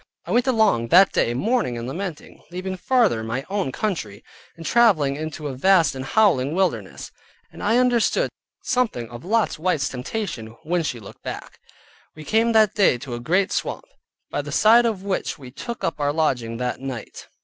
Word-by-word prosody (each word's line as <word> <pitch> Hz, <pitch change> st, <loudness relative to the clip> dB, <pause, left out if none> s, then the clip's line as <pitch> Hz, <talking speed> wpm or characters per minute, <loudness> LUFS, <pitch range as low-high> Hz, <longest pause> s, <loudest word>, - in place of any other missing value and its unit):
I -, -, -6 dB
went 245 Hz, +2 st, +2 dB
along 220 Hz, -, +3 dB
that 185 Hz, +8 st, +6 dB
day 120 Hz, -, +1 dB
mourning 210 Hz, -, 0 dB
and 115 Hz, +1 st, -5 dB
lamenting, 170 Hz, +3 st, -6 dB
leaving 185 Hz, +2 st, -4 dB
farther 210 Hz, -, +2 dB
my 120 Hz, +5 st, -3 dB
own 195 Hz, -9 st, -1 dB
country, 125 Hz, -, -3 dB, 0.3 s
and 165 Hz, -, -9 dB
traveling 160 Hz, -13 st, +3 dB
into 155 Hz, 0 st, -5 dB
a 140 Hz, -, -4 dB
vast 165 Hz, +2 st, +3 dB
and 130 Hz, -1 st, -6 dB
howling 155 Hz, -5 st, +2 dB
wilderness, 155 Hz, -, -2 dB, 0.4 s
and -, -, -11 dB
I 220 Hz, +3 st, +2 dB
understood 250 Hz, -, +2 dB, 0.3 s
something 230 Hz, -, 0 dB
of 120 Hz, +1 st, -9 dB
Lot's 215 Hz, -3 st, 0 dB
wife's 160 Hz, -5 st, 0 dB
temptation, 125 Hz, -, -5 dB
when 175 Hz, +2 st, 0 dB
she 140 Hz, -6 st, -3 dB
looked 100 Hz, -, -13 dB
back. -, -, -8 dB, 0.6 s
We 155 Hz, -, -10 dB
came 225 Hz, +4 st, +2 dB
that 215 Hz, -2 st, +4 dB
day 200 Hz, -, +3 dB
to 130 Hz, 0 st, -8 dB
a 120 Hz, -, -4 dB
great 185 Hz, +10 st, +1 dB
swamp, -, -, -3 dB, 0.5 s
by -, -, -1 dB
the -, -, -8 dB
side 235 Hz, +2 st, +5 dB
of 205 Hz, -4 st, -3 dB
which 195 Hz, -4 st, -2 dB
we 130 Hz, -4 st, -11 dB
took 235 Hz, -, -7 dB
up 165 Hz, -, -2 dB
our 145 Hz, 0 st, +1 dB
lodging 125 Hz, -7 st, -1 dB
that 125 Hz, 0 st, -3 dB
night. 130 Hz, -4 st, -7 dB
165 Hz, 180 wpm, -23 LUFS, 130-215 Hz, 0.6 s, that